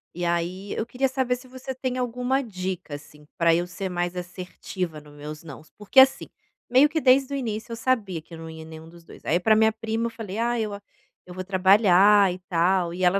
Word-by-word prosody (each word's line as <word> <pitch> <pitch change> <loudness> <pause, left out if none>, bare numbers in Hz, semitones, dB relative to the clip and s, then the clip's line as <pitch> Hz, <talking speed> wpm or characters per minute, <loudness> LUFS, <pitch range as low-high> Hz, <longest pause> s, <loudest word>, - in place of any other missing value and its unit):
E 175 0 -3
aí 175 +3 -2
eu 220 - -2
queria 255 +3 0
saber 260 -1 0
se 250 +1 -13
você 260 +1 -7
tem 255 0 -3
alguma 250 +2 -1
dica, 185 - -5
assim, 150 0 -14
pra 170 -1 +4
eu 175 +1 0
ser 190 +2 -5
mais 175 0 -2
assertiva 180 -2 -6
no 150 0 -16
meus 150 +2 -9
"nãos." 155 -1 -11
Porque 210 +5 +3
assim, 265 0 +5 0.4
meio 260 +4 +6
que 315 0 -1
desde 270 +1 +4
o - - -1
início 220 -3 -4
eu - - -3
sabia 225 -8 -1
que 165 - -18
eu - - -7
não 165 0 -8
ia 160 0 -9
nenhum 160 0 -11
dos 170 0 -16
2, - - -15
aí 170 - +2
pra 215 +4 +4
minha 220 0 +4
prima 225 +1 -3
eu - - -4
falei: 215 -3 -7
"Ah, 240 +1 0
eu 215 -2 -2
a 200 - -8 0.4
eu 180 - -11
vou 185 - -5
trabalhar 195 +1 +5
e 185 - -9
tal". 175 0 +1
E 185 +1 -4
ela 185 +2 +4
190 Hz, 230 wpm, -25 LUFS, 175-235 Hz, 0.4 s, meio